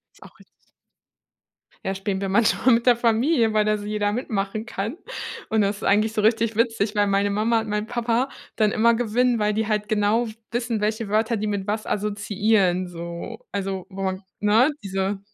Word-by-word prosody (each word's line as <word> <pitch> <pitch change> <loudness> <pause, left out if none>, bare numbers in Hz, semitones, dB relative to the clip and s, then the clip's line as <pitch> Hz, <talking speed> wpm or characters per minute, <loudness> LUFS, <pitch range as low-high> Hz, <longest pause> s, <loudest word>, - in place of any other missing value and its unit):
Ist - - -23
auch - - -15
richtig. - - -25 1.1
Ja, 190 - -1
spielen 195 0 -3
wir 195 - -2
manchmal 230 +4 +3
mit 235 +1 +1
der 245 - +6
Familie, 230 +1 +2
weil 215 -1 +3
da 215 0 +1
so 205 - -7
jeder 210 -1 0
mitmachen 215 -2 -3
kann. 225 - -4 0.5
Und 220 -1 +2
das 200 +1 -1
eigentlich 215 +2 +2
so 220 - 0
richtig 225 +1 +2
witzig, 225 -2 0
weil 205 -1 +3
meine 200 0 +1
Mama 220 +3 +2
und 220 - -6
mein 210 +1 -1
Papa 240 +2 0 0.3
dann 215 -2 +3
immer 230 +2 +4
gewinnen, 245 +1 +1
weil 210 0 +1
die 220 +1 0
halt 210 -1 -1
genau 215 +3 +2 0.2
wissen, 230 -2 -2
welche 215 +1 -1
Wörter 220 +2 +1
die 215 - -2
mit 200 -2 -2
was 215 +1 -2
assoziieren 205 -2 +1
so. 170 +6 -7
Also, 195 -2 -3
wo 190 -1 -2 0.3
ne? 220 +7 +4
Diese 195 0 -2
215 Hz, 185 wpm, -23 LUFS, 200-230 Hz, 1.1 s, der